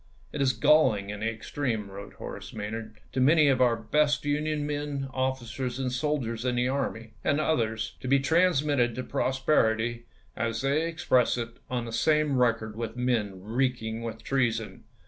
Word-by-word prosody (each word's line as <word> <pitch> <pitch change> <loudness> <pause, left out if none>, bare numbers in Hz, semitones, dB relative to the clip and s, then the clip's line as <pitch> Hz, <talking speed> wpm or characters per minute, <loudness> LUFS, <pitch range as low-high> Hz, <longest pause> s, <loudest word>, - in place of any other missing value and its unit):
" - - -30
It 145 - -2
is 130 -2 +3
galling 115 -5 +3
in 105 - -6
the 110 +2 0
extreme," 115 -1 -3
wi^ote 100 +1 -9
Horace - - -8
Maj 105 -1 -4
nard, 110 -1 -6
" - - -30
to 130 - 0
many 150 +2 +5
of 130 -2 +2
our 120 -2 +4
best 150 +6 +1
Union 150 0 0
men, 145 -2 -3
officers, 130 -1 -2
and 130 -1 -1
sol 150 +4 0
diers 115 -2 -4
in 125 -1 0
the 125 +1 +1
army, 130 -4 -2
and 145 - +2
others, 110 -8 -1
to - - -6
be 140 +2 +5
transmitted 145 -5 +2
to 130 - -3
posterity, 120 -4 +1 0.3
as 115 +1 -2
they 145 +4 +1
express 140 -8 +2
it, 115 -1 -5
on 125 -2 -2
the 115 - -7
same 150 +3 +2
record 115 -3 +1
with 115 +1 -5
men 110 -7 -1
reeking 115 0 -1
with 115 -1 -6
treason." 115 -5 -1
125 Hz, 185 wpm, -28 LUFS, 115-140 Hz, 0.3 s, many